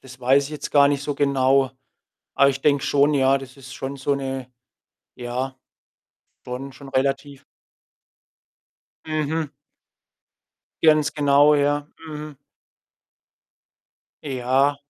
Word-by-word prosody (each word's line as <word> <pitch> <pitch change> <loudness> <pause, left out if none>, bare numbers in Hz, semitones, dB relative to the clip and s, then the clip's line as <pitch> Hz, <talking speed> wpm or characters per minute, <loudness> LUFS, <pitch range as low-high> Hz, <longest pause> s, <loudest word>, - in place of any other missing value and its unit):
das 130 -1 -14
weiß 135 +3 +3
ich 140 - -8
jetzt 150 - -6
gar 140 -1 +5
nicht 140 -1 -1
so 145 0 -3
genau. 135 -2 +2 0.7
Aber 140 - +5
ich 135 0 -4
denke 145 -2 +2
schon, 145 +1 +3
ja, 135 -1 +3
das 135 -1 -12
ist 135 0 -11
schon 135 +1 -5
so 140 +1 -1
'ne 135 -2 -5 0.6
ja, 125 +2 -4 0.9
schon 130 +2 -6
schon 140 +1 -13
relativ 135 +1 -2 1.6
Mhm. 155 0 -2 1.3
Ganz 155 -2 +4
genau, 145 0 +5
ja. 145 0 +1 0.2
Mhm. 150 -1 -8 1.9
Ja. 135 +1 +1
140 Hz, 115 wpm, -22 LUFS, 135-145 Hz, 1.9 s, gar